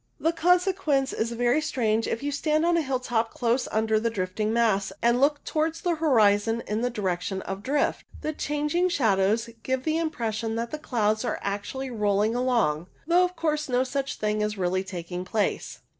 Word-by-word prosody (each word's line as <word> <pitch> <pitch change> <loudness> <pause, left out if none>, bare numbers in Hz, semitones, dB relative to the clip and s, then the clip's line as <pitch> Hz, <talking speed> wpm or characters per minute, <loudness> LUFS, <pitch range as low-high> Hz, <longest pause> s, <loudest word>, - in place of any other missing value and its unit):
The 325 +1 +1
consequence 350 -5 +2
is 230 +1 -1
very 245 +5 +2
strange 225 -6 0
if 230 - -3
you 290 - -1
stand 305 +2 +1
on 345 0 +3
a 335 - +3
hilltop 250 -5 -1
close 240 +1 0
under 220 0 +2
the 230 +1 0
drifting 210 +1 -2
mass, 215 -4 +2
and 235 +2 +2
look 290 +1 +2
towards 315 +1 -1
the 350 -2 +1
horizon 225 -6 +3
in 210 +2 -2
the 245 - +1
direction 190 -3 -2
of 195 +1 -5
drift. 280 +6 0 0.2
The 310 - -2
changing 300 +5 0
shadows 220 - +1
give 260 +1 -1
the 315 +2 0
impression 225 -8 -2
that 235 +1 -3
the 305 - -4
clouds 220 -6 0
are 240 - -1
actually 205 +7 -3
rolling 210 -1 +1
along, 230 -11 +1 0.2
though 345 +3 +4
of 360 0 -1
course 305 -3 -1
no 250 0 +2
such 270 +1 -3
thing 210 0 -1
is 210 0 -1
really 185 0 0
taking 180 -1 -5
place. 205 +3 -2
235 Hz, 185 wpm, -26 LUFS, 210-295 Hz, 0.2 s, though